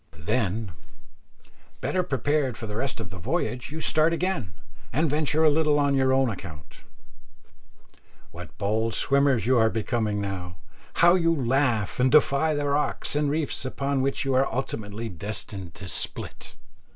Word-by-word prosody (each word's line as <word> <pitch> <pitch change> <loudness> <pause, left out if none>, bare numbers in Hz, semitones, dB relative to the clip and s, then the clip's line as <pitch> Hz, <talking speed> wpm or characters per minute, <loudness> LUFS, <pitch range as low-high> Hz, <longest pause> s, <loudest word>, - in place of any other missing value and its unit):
Then, 105 +4 -1 1.1
better 185 - 0
prepared 145 -5 -1
for 110 - -6
the 105 -1 -6
rest 130 +2 -2
of 95 -6 -7
the 95 - -8
voyage, 130 - -2
you 160 - -5
start 160 +1 +3
again, 170 - -2 0.4
and 155 +7 +1
venture 150 +1 +1
a 155 - +7
little 150 -1 +2
on 140 -1 +2
your 130 -1 +2
own 135 0 +3
account. 85 - -9 1.5
What 85 -5 -11
bold 110 +2 0
swimmers 140 -4 +2
you 125 0 +3
are 110 0 +4
becoming 110 -1 -1
now! 90 -4 -5 0.5
How 175 - +7
you 165 -3 +3
laugh 125 -6 0
and 130 +1 +3
defy 155 +1 +4
the 145 0 -1
rocks 145 0 0
and 150 -1 +1
reefs 150 -2 -1
upon 135 +1 -1
which 135 +1 -1
you 135 - 0
are 130 +1 +2
ultimately 110 -3 -4
destined 100 -1 -6
to 95 - -8
split! - - -1
130 Hz, 155 wpm, -25 LUFS, 105-145 Hz, 1.5 s, a